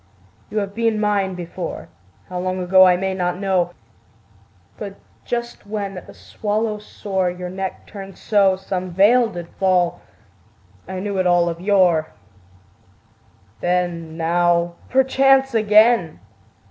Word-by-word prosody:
You 215 - -5
have 200 -1 -2
been 225 -1 0
mine 200 -3 0
before, 175 - -6 0.4
How 180 -1 -5
long 185 +1 -2
ago 185 +1 +6
I 180 -1 +4
may 190 +1 -2
not 180 -1 -1
know: 185 -3 0 1.1
But 200 -2 -6 0.3
just 235 -3 -4
when 200 -2 -4
at 180 - -9
the - - -12
swallow's 210 0 -3
soar 190 -3 -2
Your 180 0 -6
neck 190 0 -5
turned 195 -2 -10
so, 200 -3 +3
Some 185 -1 -4
veil 215 +7 +4
did 175 -4 -7
fall 185 -2 +2 0.9
I 185 0 -5
knew 200 0 -3
it 185 - +2
all 175 -1 +3
of 170 0 -6
yore. 180 -5 +2 1.5
Then, 175 -2 -2
now, 170 +1 +1 0.2
perchance 270 0 +3
again!... 215 -5 +4
190 Hz, 135 wpm, -21 LUFS, 180-210 Hz, 1.5 s, ago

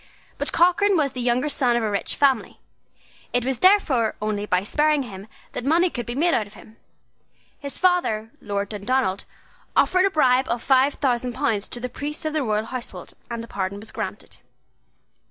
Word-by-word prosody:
But - - -3
Cochrane 375 +3 +4
was 285 -3 +1
the 250 - -5
younger 245 +3 +1
son 255 -5 +2
of 240 - 0
a 215 - -1
rich 200 - -1
family; 270 -5 +1 0.7
it 245 0 +1
was 265 -2 -1
therefore 305 - +3
only 210 -1 -2
by 185 -2 +1
sparing 300 +6 +2
him 200 -4 -9 0.2
that - - -5
money 335 +6 +3
could 240 -2 -5
be 240 - -4
made 330 +4 +2
out 215 - +1
of 205 - -17
him. 220 - -16 0.8
His 280 -2 -6
father, 345 -12 +1
Lord 200 -1 -3
Dundonald, 210 -1 -1 0.5
offered 370 +1 +4
a - - +3
bribe 260 -6 +3
of 235 0 -1
five 270 +1 +3
thousand 250 -2 0
pounds 230 -7 -1
to 245 - -5
the 250 - -3
priests 295 +5 -5
of 310 - -1
the 310 - +1
royal 215 -3 0
household; 250 +1 -7 0.2
and 235 -1 -4
a - - -9
pardon 200 -1 -3
was 220 +1 -12
granted. - - -6
250 Hz, 190 wpm, -23 LUFS, 215-295 Hz, 0.8 s, Cochrane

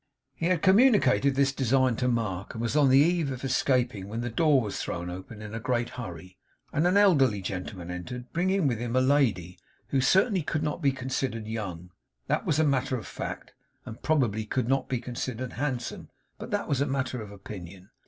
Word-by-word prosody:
He 165 +5 -2
had 180 -3 +1
communicated 190 - +5
this 135 0 +2
design 130 -2 +2
to 125 - 0
Mark, 105 -6 -2
and 115 - -4
was 115 - -1
on 145 -3 +5
the 130 - +6
eve 160 0 +3
of 130 0 -6
escaping, 125 -6 +1
when 115 +3 -4
the 120 0 -3
door 150 +2 +4
was 105 -5 -3
thrown 90 +1 -4
open 95 +4 -9
in 105 0 -8
a 115 - -3
great 120 +1 -1
hurry, 90 -5 -8 0.4
and 155 +4 +2
an 185 +3 +3
elderly 140 - +4
gentleman 90 -1 -5
entered; 125 +8 -6
bringing 185 +1 +1
with 120 -5 +1
him 120 +1 -3
a - - +5
lady 125 -10 +1 0.3
who 135 - +2
certainly 190 - +3
could 150 0 -2
not 150 +2 -2
be 140 -3 +3
considered 130 -3 -3
young 95 -6 -5 0.3
that - - -1
was 150 - +2
matter 135 -3 +1
of 110 - -8
fact; - - -6 0.3
and 110 - -9
probably 120 -9 +1
could 115 +2 -2
not 135 0 0
be 130 - 0
considered 125 0 -5
handsome 125 -3 -3 0.3
but - - -7
that - - -1
was 140 -1 +1
matter 130 -3 -2
of 105 - -8
opinion. 95 0 -10
125 Hz, 195 wpm, -27 LUFS, 110-140 Hz, 0.4 s, the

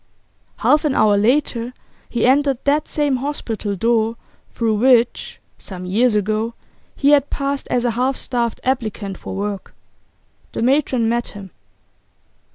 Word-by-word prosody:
Half 300 +1 +3
an 295 -4 0
hour 215 -1 +4
later 240 +2 +1 0.3
he 235 - 0
entered 275 +1 +3
that 295 +2 +1
same 290 -3 0
hospital 230 -7 -3
door 225 +2 +1 0.4
through 225 -2 0
which, 240 0 +2 0.2
some 185 -2 -7
years 220 +5 +2
ago, 215 +3 -1 0.4
he 280 - +2
had 290 -1 +4
passed 280 0 -3
as 245 0 0
a 240 - +2
half 255 +4 0
starved 235 -3 -2
applicant 220 -6 -2
for - - -7
work. 200 -1 -4 0.8
The - - -2
matron 260 -3 +2
met 235 +1 0
him. 195 -3 -10
235 Hz, 140 wpm, -20 LUFS, 215-270 Hz, 0.8 s, hour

